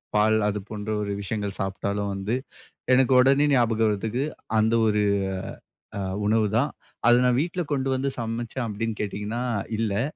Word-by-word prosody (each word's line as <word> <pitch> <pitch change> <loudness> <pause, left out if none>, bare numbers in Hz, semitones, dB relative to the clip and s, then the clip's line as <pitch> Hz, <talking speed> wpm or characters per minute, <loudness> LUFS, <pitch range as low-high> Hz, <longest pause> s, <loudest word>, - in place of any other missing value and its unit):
பால் 110 +1 +4
அது 105 0 -1
போன்ற 105 0 -5
ஒரு 100 - -3
விஷயங்கள் 100 -1 -3
சாப்பிட்டாலும் 100 +1 -2
வந்து, 100 +4 -2 0.6
எனக்கு 130 +1 +4
உடனே 135 +3 +5
ஞாபகம் 115 -3 +3
வரத்துக்கு 110 +5 -1 0.4
அந்த 110 +1 +2
ஒரு 105 -1 +2 1.0
அ - - -2 0.3
உணவு 110 0 +3
தான். 140 +5 +1 0.4
அதை 120 0 +7
நான் 125 0 +3
வீட்ல 175 +2 -2
கொண்டு 135 -1 0
வந்து 130 +1 0
சமைச்சேன் 115 +1 -3
அப்படின்னு 110 +1 -3
கேட்டீங்கன்னா 105 +3 -3 0.4
இல்லை. 110 -1 0
110 Hz, 150 wpm, -25 LUFS, 105-125 Hz, 1.0 s, அதை